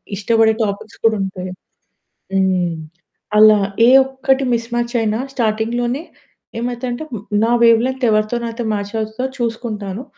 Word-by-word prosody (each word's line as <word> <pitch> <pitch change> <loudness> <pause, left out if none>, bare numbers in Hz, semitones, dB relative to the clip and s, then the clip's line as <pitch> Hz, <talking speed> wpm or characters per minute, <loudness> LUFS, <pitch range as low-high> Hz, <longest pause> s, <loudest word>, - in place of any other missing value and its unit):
ఇష్టపడే 220 +2 +3
టాపిక్స్ 200 +2 -6
కూడా 225 -1 +4
ఉంటాయి. 185 -1 -5 0.8
హ్మ్. 185 -3 +1 0.6
అలా 215 0 +7 0.3
ఏ - - +7 0.2
ఒక్కటి 265 0 0
మిస్‌మ్యాచ్ 235 +1 -2
అయినా 220 0 0
స్టార్టింగ్‌లోనే 240 +4 -1 0.6
ఏమైతది 245 +1 -3
అంటే, 240 +6 -4
హ్మ్, 215 -4 -6 0.2
నా 230 - +2
వేవ్ 230 -1 +6
లెంత్ 260 0 -4
ఎవరితో 215 +2 +1
నాతో 230 +1 -4
మ్యాచ్ 205 -1 -4
అవుతదో 220 +3 -3
చూసుకుంటాను. 225 -3 -4
225 Hz, 130 wpm, -18 LUFS, 210-240 Hz, 0.8 s, అలా